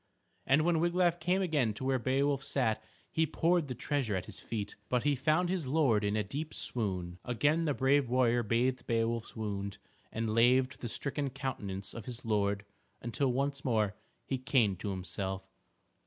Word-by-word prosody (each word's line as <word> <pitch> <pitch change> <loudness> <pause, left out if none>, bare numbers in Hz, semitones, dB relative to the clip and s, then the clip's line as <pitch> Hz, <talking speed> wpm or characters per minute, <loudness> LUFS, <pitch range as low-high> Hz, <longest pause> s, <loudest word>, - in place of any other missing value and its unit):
And 140 +4 +5
when 170 -2 +3
Wiglaf 175 0 +2
came 180 +3 +1
again 145 - +1
to 130 - -6
where 130 -1 +2
Beowulf 135 +2 +1
sat 110 -5 0 0.3
he 160 0 +2
poured 165 +1 +2
the 125 - -4
treasure 130 -5 -1
at 90 - -2
his - - -8
feet. 105 -3 -4
But 125 -1 +1
he 145 -1 +3
found 155 +7 +2
his 180 -6 -1
lord 130 -7 +3
in 105 0 +1
a 105 - +1
deep 145 +10 -5
swoon. 90 -6 -2
Again 145 +7 +1
the 145 -3 +1
brave 135 -1 +3
warrior 120 -1 +3
bathed 120 +3 0
Beowulf's 115 0 0
wound 100 -2 -3 0.3
and 110 -1 -1
laved 130 +3 +3
the 120 - -3
stricken 140 +3 -2
countenance 105 -8 -4
of 115 - -7
his 125 -1 -7
lord, 100 -2 +1 0.3
until 125 +3 0
once 140 +2 -1
more 110 -5 +1 0.3
he 135 - -2
came 125 -6 +2
to 100 - -4
himself. 95 +1 -3
125 Hz, 175 wpm, -32 LUFS, 110-145 Hz, 0.3 s, And